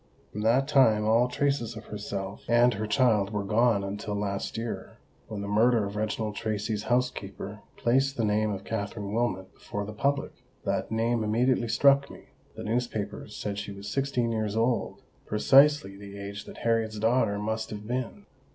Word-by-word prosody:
From 105 - -5
that 120 +5 +3
time 115 -8 +4
all 115 +3 +4
traces 125 -3 -1
of 110 - -9
herself 100 -1 -5
and 120 +1 +5
her 105 +1 -3
child 110 -4 +3
were 105 -2 -1
gone 110 0 +2
until 100 +1 -4
last 100 0 -3
year, 115 0 -5 0.3
when 105 -2 -5
the 100 - -4
murder 110 +1 +3
of 100 +1 -6
Reginald 110 0 -2
Tracy's 105 0 -2
housekeeper 110 -4 -2 0.2
placed 135 +3 +2
the 115 - +1
name 105 +1 +1
of 95 -2 -5
Katherine 105 -1 -4
Wilmot 100 -5 -1
before 105 0 -5
the 105 - -7
public. 140 +6 0 0.3
That - - -1
name 115 +1 +1
immediately 120 +3 +2
struck 140 +4 +4
me: - - -13 0.3
the - - -7
newspapers 110 -3 -3
said 100 -1 -3
she 100 - -5
was 100 +1 -9
sixteen 125 0 0
years 110 -2 -1
old—precisely 125 +2 +2
the 100 0 -10
age 100 0 -7
that - - -11
Harriet's 115 -2 0
daughter 110 -1 +2
must 110 +2 -2
have 105 0 -7
been. 130 - -4
110 Hz, 170 wpm, -28 LUFS, 105-120 Hz, 0.3 s, and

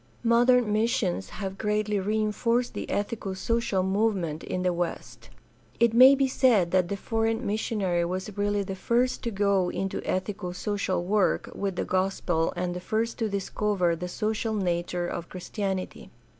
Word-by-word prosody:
— - - -21
^Modern 245 +1 +5
missions 215 -3 0
have 195 -1 -6
greatly 210 -1 0
reinforced 215 +4 0
the - - -5
ethico 205 -2 -3
social 230 -3 0
movement 190 -5 0
in 180 - -3
the 180 -1 +2
West. 175 0 -5 0.5
It 235 -1 +4
may 260 +4 +9
be 275 0 +2
said 230 -10 +3
that 185 -2 +3
the 200 - -3
foreign 225 +2 -1
missionary 200 -4 0
was 185 +3 -4
really 205 0 0
the 195 - -5
first 240 +6 0
to - - +1
go 200 -3 +1
into 195 +1 -3
ethico 185 -1 -3
social 200 -3 -1
work 200 +2 +1
with 195 -2 -3
the - - -2
gospel 185 -3 0
and 175 0 -2
the 180 - -4
first 225 +6 -2
to 225 -2 0
discover 195 -2 0
the 180 +2 -5
social 215 +4 -2
nature 175 -2 -1
of 175 -1 -5
Christianity. 190 +1 -4
200 Hz, 160 wpm, -27 LUFS, 185-225 Hz, 0.5 s, may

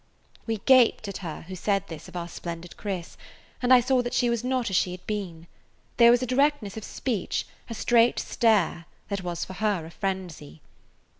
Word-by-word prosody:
We 225 -1 0
gaped 245 -2 +4
at 200 - -5
her 165 -5 -7
who 185 +3 -8
said 195 +1 0
this 160 -5 -9
of - - -13
our 170 -1 -3
splendid 170 0 -7
Chris, 190 -5 -5 0.4
and 250 0 +1
I 255 -1 +8
saw 255 +1 +2
that 245 0 -3
she 245 -1 +2
was 235 0 -1
not 250 -4 0
as - - 0
she 180 - +3
had 180 - -11
been. 185 -6 -4 0.5
There 235 -1 +8
was 240 +1 +4
a - - +1
directness 260 -5 +1
of 220 - -6
speech, 225 -5 -2 0.2
a 230 - -5
straight 235 +1 +3
stare, 205 -7 +1 0.2
that 200 -2 -2
was 175 -1 -3
for 185 - -9
her 200 -4 -1
a 165 - -10
frenzy. 180 - -5
205 Hz, 200 wpm, -26 LUFS, 175-240 Hz, 0.5 s, I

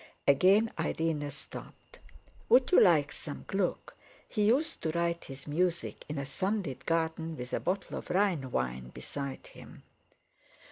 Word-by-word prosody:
Again 195 +10 +5
Irene 160 -2 -1
stopped. 140 -1 -11 0.5
"Would 255 0 +5
you - - +8
like 155 -7 +5
some 145 - -6
Gluck? 195 -2 -1 0.3
He 215 - -2
used 295 +8 +2
to 160 - -1
write 170 +1 -1
his 135 0 -10
music 170 +3 -1
in 150 - -3
a 140 - -2
sunlit 190 - -2
garden, 165 -1 0
with 125 0 -7
a - - +1
bottle 190 +1 -2
of - - -12
Rhine 180 -8 +1
wine 65 - -2
beside 140 - -6
him." - - -13
165 Hz, 145 wpm, -31 LUFS, 140-190 Hz, 0.5 s, you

